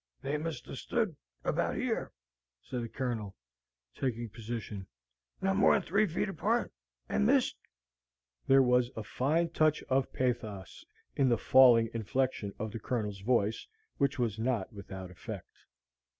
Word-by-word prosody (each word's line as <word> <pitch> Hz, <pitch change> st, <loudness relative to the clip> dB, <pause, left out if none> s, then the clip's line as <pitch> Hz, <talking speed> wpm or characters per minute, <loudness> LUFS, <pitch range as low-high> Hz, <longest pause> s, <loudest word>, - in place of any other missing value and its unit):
"They 140 Hz, -, -1 dB
must 155 Hz, -5 st, -4 dB
hev 135 Hz, -, -7 dB
stood 220 Hz, -9 st, -1 dB, 0.3 s
about -, -, 0 dB
yer," -, -, -1 dB, 0.5 s
said 125 Hz, -, -4 dB
the 115 Hz, -, -5 dB
Colonel, 115 Hz, -7 st, -3 dB, 0.6 s
taking 120 Hz, -3 st, -2 dB
position; 110 Hz, -3 st, -6 dB, 0.6 s
"not 195 Hz, 0 st, +2 dB
mor'n 200 Hz, -1 st, +5 dB
three 205 Hz, +5 st, +2 dB
feet 170 Hz, -, -1 dB
apart, 210 Hz, +6 st, 0 dB, 0.3 s
and 70 Hz, -, +1 dB
missed!" -, -, +3 dB, 0.9 s
There 135 Hz, 0 st, +7 dB
was 125 Hz, -1 st, +3 dB
a 110 Hz, -, -4 dB
fine 155 Hz, +10 st, +1 dB
touch 155 Hz, -2 st, +2 dB
of 130 Hz, 0 st, +2 dB
pathos 115 Hz, -7 st, -3 dB, 0.3 s
in 135 Hz, -2 st, +3 dB
the 120 Hz, -, +3 dB
falling 120 Hz, -2 st, +6 dB
inflection 115 Hz, -1 st, -1 dB
of 110 Hz, 0 st, -4 dB
the 115 Hz, -, -5 dB
Colonel's 105 Hz, -3 st, -2 dB
voice, 110 Hz, -1 st, +1 dB, 0.3 s
which 140 Hz, -2 st, +1 dB
was 115 Hz, -4 st, -1 dB
not 120 Hz, -2 st, -1 dB
without 95 Hz, -2 st, -8 dB
effect. 90 Hz, -, -8 dB
125 Hz, 140 wpm, -31 LUFS, 110-140 Hz, 0.9 s, There